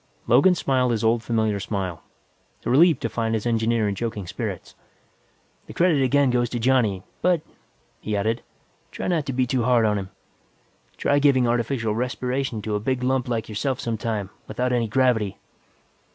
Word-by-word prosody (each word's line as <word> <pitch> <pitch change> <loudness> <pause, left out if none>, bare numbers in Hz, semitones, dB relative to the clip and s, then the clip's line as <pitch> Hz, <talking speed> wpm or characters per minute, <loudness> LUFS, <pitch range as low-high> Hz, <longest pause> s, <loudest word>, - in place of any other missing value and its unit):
Logan 140 +10 +5
smiled 130 -6 +1
his 115 -2 -1
old 115 +1 +3
familiar 110 -3 0
smile, 95 -4 -4 0.6
relieved 160 +6 +5
to - - +1
find 115 0 -1
his 110 - -3
engineer 115 -1 +1
in 100 - 0
joking 105 -1 -4
spirits. - - -5 0.9
"The - - -9
credit 170 -5 +3
again 135 0 +3
goes 120 -1 +1
to 120 - -3
Johnny. 115 -6 +2 0.2
But," 175 -2 +2 0.6
he 105 -1 -2
added, 110 +4 0 0.5
"try - - -5
not 165 -5 0
to 135 - -2
be 130 0 +1
too 125 0 0
hard 120 -1 +3
on 105 -1 +1
him. 95 -1 -7 0.9
Try 145 - +2
giving 135 -4 +4
artificial 120 -1 0
respiration 125 0 -2
to 110 - -3
a 105 - 0
big 125 +3 -2
lump 130 0 +1
like 115 -2 -2
yourself 125 +5 -2
sometime, 110 -3 -3 0.2
without 125 0 -1
any 120 -2 +1
gravity." 110 -4 +1
120 Hz, 165 wpm, -24 LUFS, 110-130 Hz, 0.9 s, Logan